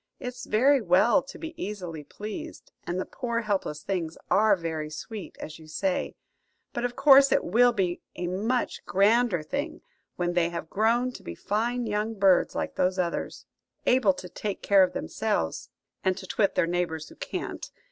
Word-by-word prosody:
It's 250 0 -6
very 265 +5 +4
well 215 +8 +4
to 270 - -11
be 325 0 -7
easily 180 -7 -5
pleased, 215 - -8 0.2
and 175 +1 -1
the - - -2
poor 235 -1 -3
helpless 195 -8 -2
things 170 -4 -3
are 215 0 +5
very 160 -3 -4
sweet, 195 +6 -8
as 155 +1 -8
you 160 - -14
say; 185 +4 -1 0.6
but 240 - -2
of 245 0 -2
course 275 0 +7
it - - +3
will 240 +7 +4
be 185 -6 -1
a 180 - -3
much 215 +8 -1
grander 205 -2 +3
thing 285 - -4 0.3
when 175 0 -1
they 175 -1 +2
have 170 -2 -6
grown 235 +4 +2
to - - -10
be 85 - -7
fine 235 - -1
young 215 +1 -1
birds 195 -3 +4
like - - -3
those 185 +1 +2
others; 175 -2 -2 0.4
able 245 -7 +4
to 185 - -8
take 200 +2 -5
care 200 -1 +5
of 185 -1 +3
themselves 80 0 -2 0.3
and 190 0 +1
to 190 - -7
twit 200 +1 +1
their - - +3
neighbours 170 -2 -2
who - - -14
can't. - - -5
200 Hz, 180 wpm, -27 LUFS, 175-240 Hz, 0.6 s, course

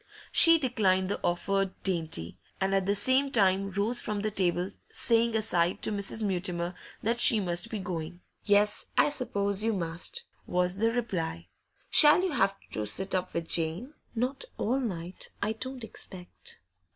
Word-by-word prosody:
She 330 -1 +9
declined 200 - +1
the - - -2
offered 195 +2 0
dainty, 160 - -3 0.2
and 195 0 0
at 195 -1 0
the 200 - +1
same 265 +5 +2
time 195 -4 +2
rose 205 +5 0
from 210 -1 -3
the 215 +1 -2
table, 180 -2 0 0.2
saying 230 -1 +1
aside 180 -5 0
to - - +2
Mrs. 205 +2 -2
Mutimer 180 -3 -1 0.3
that 235 +2 0
she 235 -3 +8
must 175 +1 -2
be 220 - -4
going. 175 -2 -6 0.2
'Yes, 205 0 +2
I - - +4
suppose 200 -7 -2
you 225 0 +1
must,' 170 -3 -3 0.2
was 180 +1 0
the 225 +2 +2
reply. 170 -9 -4 0.4
'Shall 300 +4 +7
you 375 - -1
have 195 -8 +1 0.2
to 105 -1 -3
sit 190 - -1
up 185 -1 -2
with 170 -1 -3
Jane?' 170 - 0 0.2
'Not 255 +4 -2
all 250 +5 0
night, 180 -7 -4
I 220 - -1
don't 255 +2 -6
expect. 185 -4 -7
195 Hz, 165 wpm, -28 LUFS, 180-225 Hz, 0.4 s, She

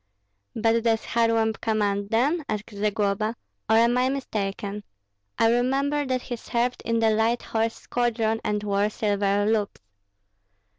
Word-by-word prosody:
"But 225 +1 +2
does 225 -1 +1
Kharlamp 230 -1 +1
command 205 -2 0
them," 285 +9 +1
asked 215 +1 -4
Zagloba, 210 +1 -1 0.3
"or 220 - +5
am 235 +2 +4
I 255 +1 +2
mistaken? 205 -6 -3 0.5
I 225 - +4
remember 275 +4 +1
that 255 -1 -1
he 240 - -5
served 240 +2 -1
in 230 0 0
the 225 -1 +3
light 225 +2 +1
horse 225 0 -1
squadron 225 -2 -1
and 210 0 -1
wore 205 0 +1
silver 205 -1 0
loops." 215 -1 0
225 Hz, 140 wpm, -25 LUFS, 210-240 Hz, 0.5 s, or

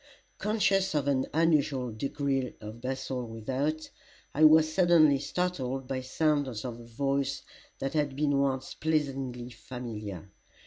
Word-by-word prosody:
Conscious 200 -4 +1
of 145 -2 +1
an 130 -2 +1
unusual 150 -6 +2
degree 135 +2 -2
of 110 +2 -9
bustle 130 0 -3
without, 135 +8 -2 0.5
I 155 - +2
was 155 0 +7
suddenly 165 -6 +5
startled 135 -4 -2
by 130 -1 -2
sounds 135 -3 0
of 120 -2 -5
a - - -10
voice 135 +4 -1 0.3
that 135 - -3
had 145 -3 0
been 145 -1 +1
once 135 -1 -1
pleasingly 135 -5 -2
familiar. 110 -6 -7
135 Hz, 130 wpm, -29 LUFS, 125-155 Hz, 0.5 s, was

